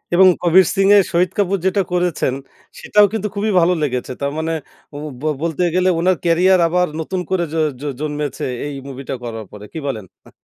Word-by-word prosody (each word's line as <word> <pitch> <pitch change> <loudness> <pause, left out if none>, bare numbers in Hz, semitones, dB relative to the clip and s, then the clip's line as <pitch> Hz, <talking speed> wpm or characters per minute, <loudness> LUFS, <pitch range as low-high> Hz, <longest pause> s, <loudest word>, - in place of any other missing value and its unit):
এবং 190 +1 +7
'কবীর 180 +2 +5
সিং' 195 0 +3
এ - - +8
শহিদ 175 +1 +2
কাপুর 195 -1 +1
যেটা 190 +1 +2
করেছেন 175 -7 0 0.5
সেটাও 210 0 +4
কিন্তু 215 -1 -1
খুবই 210 +2 0
ভালো 175 +1 +3
লেগেছে। 125 -3 -2
তার 140 0 -1
মানে 160 +1 -1 0.4
ও - - -7 0.2
ব - - -12 0.2
বলতে 165 0 -2
গেলে 185 0 +3
উনার 185 +2 +3
ক্যারিয়ার 180 +2 +4
আবার 180 +2 +1
নতুন 185 +4 -3
করে 185 -2 +1
জ - - -3 0.3
জ - - -8 0.2
জন্মেছে 150 -1 -3 0.2
এই 145 - -4
মুভিটা 135 0 -6
করার 115 -2 -6
পরে। 105 0 -10
কি 160 - -4
বলেন? 110 -7 -4 0.2
আ - - -14
175 Hz, 195 wpm, -19 LUFS, 145-185 Hz, 0.5 s, এ